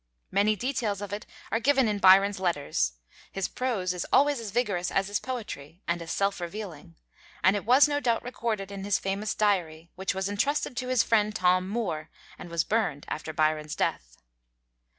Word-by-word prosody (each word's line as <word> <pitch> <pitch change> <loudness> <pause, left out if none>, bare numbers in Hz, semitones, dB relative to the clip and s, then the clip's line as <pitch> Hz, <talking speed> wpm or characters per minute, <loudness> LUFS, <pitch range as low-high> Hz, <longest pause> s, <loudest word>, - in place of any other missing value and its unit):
Many 205 +3 +3
details 225 -3 -2
of 200 -1 -6
it 210 - -5 0.2
are 225 - +2
given 265 0 +3
in 210 -1 -1
Byron's 195 +1 +6
letters, 145 - 0 0.4
his 195 -1 -2
prose 215 -8 -1
is 180 - -3
always 285 -1 +4
as 225 -2 -5
vigorous 200 -5 0
as 195 0 0
his 205 - 0
poetry, 210 - -7
and 170 0 0
as 165 - -6
self 195 0 0
revealing, 175 -3 -7 0.5
and 190 +2 +5
it 200 - -3
was 255 +6 +6
no 290 -1 0
doubt 235 -5 0
recorded 225 -5 -3
in 195 -1 -6
his 200 -1 +2
famous 200 +2 -2
Diary, 170 -6 0
which 190 0 -2
was 190 0 -1
intrusted 250 +7 0
to 250 - -2
his 255 -2 +3
friend 215 -2 +2
Tom 185 -1 +2
Moore, 170 -9 -3 0.3
and 175 - -8
was 170 -2 +1
burned 200 -10 -1
after 155 +1 -4
Byron's 155 -1 0
death. - - -2
200 Hz, 185 wpm, -28 LUFS, 175-225 Hz, 0.5 s, Byron's